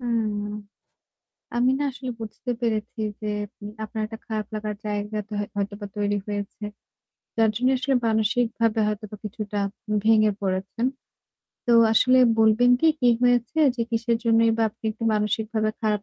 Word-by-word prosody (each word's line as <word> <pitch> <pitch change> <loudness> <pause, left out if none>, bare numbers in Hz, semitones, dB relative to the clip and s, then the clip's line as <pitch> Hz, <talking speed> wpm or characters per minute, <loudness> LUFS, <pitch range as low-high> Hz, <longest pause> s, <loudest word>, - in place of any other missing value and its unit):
হুম। 215 -4 -1 1.1
আমি 245 +2 +3
না - - 0
আসলে 255 -1 -7
বুঝতে 225 +3 -7
পেরেছি 220 -1 -2 0.2
যে 215 - -3 0.3
মে 205 - -6 0.2
আপনার 220 0 -5
একটা 225 0 -8
খারাপ 215 -3 -3
লাগার 210 0 -3
জায়গা 210 0 -3
তো - - -7 0.2
হয়তোবা 205 +1 -3
তৈরি 205 0 +1
হয়েছে। 205 0 -5 0.7
যার 225 -1 +4
জন্য 250 +3 +2
আসলে 260 +2 0
মানসিকভাবে 225 +1 +1
হয়তোবা 210 0 -4
কিছুটা 210 0 -5 0.5
ভেঙে 215 -1 +5
পড়েছেন। 195 +4 -2 0.8
তো 240 - +3 0.2
আসলে 255 +3 +5 0.2
বলবেন 225 +2 +5
কি 325 - +4
কি 245 - +4
হয়েছে? 245 +4 +2 0.2
যে - - -3
কিসের 230 0 +1
জন্যই 230 0 +4
বা 230 - +1
আপনি 220 +2 -27
একটু 225 +2 -6
মানসিকভাবে 215 +1 0
খারাপ 210 -2 0
220 Hz, 145 wpm, -24 LUFS, 210-235 Hz, 1.1 s, ভেঙে